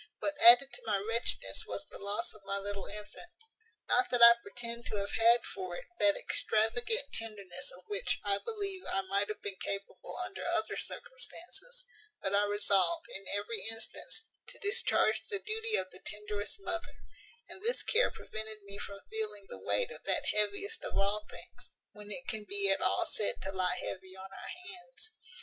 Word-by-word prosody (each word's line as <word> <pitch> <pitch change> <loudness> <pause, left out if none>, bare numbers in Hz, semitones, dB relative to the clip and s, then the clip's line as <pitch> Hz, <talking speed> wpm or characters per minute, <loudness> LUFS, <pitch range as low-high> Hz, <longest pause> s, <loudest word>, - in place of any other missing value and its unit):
What 300 - -1
added 335 -6 +10
to - - -8
my 210 -2 +1
wretchedness 225 +4 0
was - - -4
the - - -11
loss 200 +1 -2
of 215 - -15
my 195 0 -2
little 200 0 -4
infant: 210 +11 -7 0.6
not 375 - +3
that 245 -1 +5
I 235 0 +13
pretend 235 -1 -4
to - - -3
have 200 0 -2
had 230 +1 +5
for 185 -2 -5
it - - -7
that 200 -1 +5
extravagant 240 - +1
tenderness 200 -5 -5
of 180 - -17
which 205 -2 -1
I 200 -1 +2
believe 400 - -1
I 195 - +1
might 200 +2 0
have 215 - -5
been 200 -2 -4
capable 200 0 -5
under 375 - -7
other - - 0
circumstances; - - -8 0.3
but 195 - -2
I 205 +1 +4
resolved, 205 - +2
in 195 0 -6
every 205 +3 -1
instance, 225 - -4 0.2
to - - -9
discharge 405 +1 +3
the 415 - 0
duty 440 +2 -1
of 185 - 0
the 185 - -10
tenderest 210 - -5
mother; 340 -3 -2 0.5
and 380 - -10
this 470 +3 0
care - - +4
prevented 215 -1 -6
me 200 0 -9
from 200 -1 -6
feeling 210 -2 -3
the - - -8
weight 485 -1 +1
of - - -9
that - - +1
heaviest 215 - 0
of - - -3
all 205 +2 +1
things, - - -10 0.2
when 210 0 -11
it 265 +5 -4
can 220 -2 -2
be 200 -1 +2
at 195 - +2
all 355 - +3
said 215 -10 +2
to 190 - 0
lie 185 -1 +1
heavy 190 0 -6
on 190 +1 -9
our - - -8 0.2
hands. 435 +4 -12
215 Hz, 185 wpm, -33 LUFS, -, 0.6 s, I